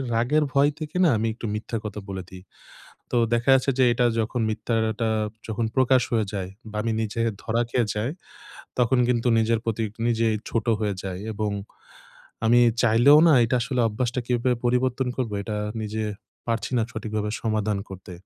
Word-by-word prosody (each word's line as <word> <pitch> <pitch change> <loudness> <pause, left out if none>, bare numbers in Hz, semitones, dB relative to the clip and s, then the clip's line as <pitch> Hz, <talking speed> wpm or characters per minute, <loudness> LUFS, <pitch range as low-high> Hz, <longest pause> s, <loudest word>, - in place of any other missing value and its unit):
রাগের 140 +7 +2
ভয় 140 +1 +4
থেকে 155 +1 -7
না, 170 - +5
আমি 115 +1 0
একটু 115 - -8
মিথ্যা 115 +2 -4
কথা 105 0 -5
বলে 95 -1 -5
দেই। 95 -1 -11 0.7
তো - - 0 0.2
দেখা 120 +2 -1
যাচ্ছে 135 +1 +2
যে 130 - +5
এটা 120 +1 +1 0.2
যখন 115 +2 -2
মিথ্যাটা 110 +1 -1 0.4
যখন 110 +1 -1
প্রকাশ 130 -1 +4
হয়ে 110 -2 +2
যায় 95 -2 -3 0.2
বা, 105 - -7
আমি 115 0 -1
নিজে 110 +1 -3 0.2
ধরা 115 +1 0
খেয়ে 120 -2 +1
যাই, 105 +4 -1 0.7
তখন 125 +1 +3
কিন্তু 120 0 +1
নিজের 115 0 +2
প্রতি 115 0 -1 0.2
নিজেই 115 -1 +2
ছোট 115 - -1
হয়ে 105 -2 0
যাই 95 -1 -4
এবং 105 0 -2 1.0
আমি 120 +2 +5 0.2
চাইলেও 120 +6 +6
না - - +6
এটা 125 +2 +1
আসলে 125 0 -1
অভ্যাসটা 120 +3 -2
কিভাবে 125 +1 +1
পরিবর্তন 125 +1 +1
করবো, 115 -5 -2
এটা 105 +1 -4 0.3
নিজে 110 +1 -3 0.5
পারছি 115 -3 -1
না - - +2
সঠিকভাবে 110 -2 -3
সমাধান 110 -2 0
করতে। 95 -1 -10
115 Hz, 170 wpm, -24 LUFS, 110-125 Hz, 1.0 s, চাইলেও